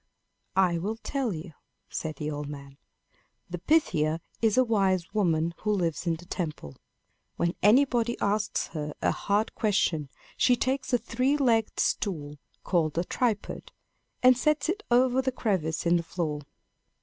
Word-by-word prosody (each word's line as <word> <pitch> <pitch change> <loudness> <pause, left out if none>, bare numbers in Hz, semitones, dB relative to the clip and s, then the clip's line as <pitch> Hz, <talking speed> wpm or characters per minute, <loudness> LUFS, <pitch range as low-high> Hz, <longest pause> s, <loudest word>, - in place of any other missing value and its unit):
"I 180 -3 +3
will 205 +6 -2
tell 270 -5 -1
you," 165 -1 -6 0.4
said 155 -1 -4
the 150 +2 -4
old 145 0 -5
man. 140 -1 -9 0.7
"The 180 - -4
Pythia 165 - +2 0.2
is 225 -1 +2
a 255 - +6
wise 195 -6 +1
woman, 170 -5 +1
who 210 - -1
lives 175 -4 -1
in 165 - +2
the 170 +2 -12
temple. 155 - -5 0.6
When 170 0 0
anybody 240 +2 +3
asks 205 0 0
her 150 -2 -5
a - - +3
hard 205 +2 0
question, 170 -8 +1 0.3
she 250 - +4
takes 260 +2 -1
a 245 - +4
three 255 +5 0
legged 230 -6 +1
stool, 150 -7 -1 0.2
called 165 -4 0
a 170 - +2
tripod, 225 +2 -2 0.5
and 255 0 +8
sets 305 +5 +1
it 400 +4 -1
over 250 +1 +4
the 260 0 0
crevice 185 -11 -1
in 170 +1 +4
the - - -1
floor. 160 -3 -3
190 Hz, 155 wpm, -28 LUFS, 160-240 Hz, 0.7 s, and